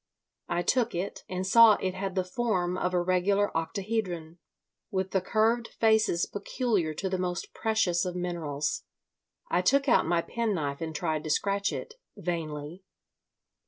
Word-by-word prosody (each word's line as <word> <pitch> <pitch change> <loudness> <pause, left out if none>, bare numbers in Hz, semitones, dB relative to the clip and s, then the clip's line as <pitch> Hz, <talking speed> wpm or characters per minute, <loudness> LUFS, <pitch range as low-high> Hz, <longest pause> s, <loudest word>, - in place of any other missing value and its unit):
I 175 - 0
took 240 +1 +1
it, 180 +3 -4
and 185 0 -2
saw 230 +3 +8
it 185 -1 -2
had 190 0 -4
the 185 - +1
form 180 -2 -1
of 180 0 -1
a - - +4
regular 195 +3 +1
octahedron, 175 -1 -3 0.5
with 190 -1 -2
the 190 - +2
curved 225 +4 +1
faces 220 -6 +3
peculiar 205 - -1
to 190 - -2
the 185 -1 -1
most 180 0 -3
precious 220 -6 +1
of 180 -1 -3
minerals. 165 -5 -2 0.7
I 180 - +3
took 275 +9 +3
out 240 - +4
my 170 0 +2
penknife 180 -12 -2
and 160 -1 -4
tried 155 -2 -1
to - - -3
scratch 200 +5 +1
it—vainly. 170 - -6
185 Hz, 150 wpm, -28 LUFS, 170-215 Hz, 0.7 s, saw